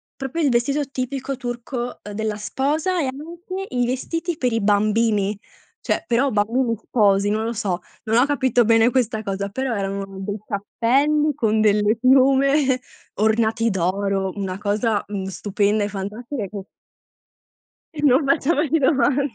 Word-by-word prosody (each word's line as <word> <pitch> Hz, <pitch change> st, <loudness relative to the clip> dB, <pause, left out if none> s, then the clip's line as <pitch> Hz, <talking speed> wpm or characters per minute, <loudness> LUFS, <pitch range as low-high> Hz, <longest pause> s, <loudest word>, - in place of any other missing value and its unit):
Proprio 270 Hz, +5 st, -4 dB
il 285 Hz, -, +3 dB
vestito 275 Hz, +5 st, +1 dB
tipico 270 Hz, +1 st, -3 dB
turco 245 Hz, 0 st, -5 dB
della 215 Hz, 0 st, -2 dB
sposa, 295 Hz, -, -1 dB
e -, -, 0 dB
anche 340 Hz, +8 st, -6 dB
i 245 Hz, -1 st, +2 dB
vestiti 330 Hz, +7 st, -3 dB
per 250 Hz, -5 st, 0 dB
i 225 Hz, -, +1 dB
bambini, 210 Hz, 0 st, +2 dB, 0.4 s
cioè -, -, -1 dB
però 255 Hz, +3 st, +2 dB
bambini 230 Hz, +3 st, +1 dB
sposi, 205 Hz, -3 st, +2 dB
non 215 Hz, +1 st, 0 dB
lo 230 Hz, +1 st, -2 dB
so, 200 Hz, -5 st, -2 dB, 0.2 s
non 225 Hz, +1 st, +2 dB
ho 245 Hz, -, +5 dB
capito 260 Hz, -5 st, +2 dB
bene 225 Hz, +1 st, +5 dB
questa 240 Hz, -3 st, 0 dB
cosa, 200 Hz, 0 st, -3 dB
però 260 Hz, +2 st, -2 dB
erano 195 Hz, 0 st, -3 dB, 0.2 s
dei 205 Hz, +2 st, -4 dB
cappelli 280 Hz, +9 st, +1 dB
con 220 Hz, -1 st, +1 dB
delle 210 Hz, +1 st, +3 dB
piume, 265 Hz, +1 st, +4 dB, 0.4 s
ornati 220 Hz, +2 st, +2 dB
d'oro, 195 Hz, +1 st, -1 dB
una 190 Hz, -2 st, -4 dB
cosa, 210 Hz, +1 st, 0 dB
mhmm, 200 Hz, -2 st, -4 dB
stupenda 205 Hz, +2 st, 0 dB
e 205 Hz, -, -2 dB
fantastica 210 Hz, +4 st, -5 dB
che 195 Hz, -1 st, -8 dB, 1.3 s
E -, -, -3 dB
non 275 Hz, +1 st, +4 dB
facciamoci 310 Hz, +1 st, +2 dB
domande. 280 Hz, -2 st, +2 dB
235 Hz, 145 wpm, -22 LUFS, 205-270 Hz, 1.3 s, ho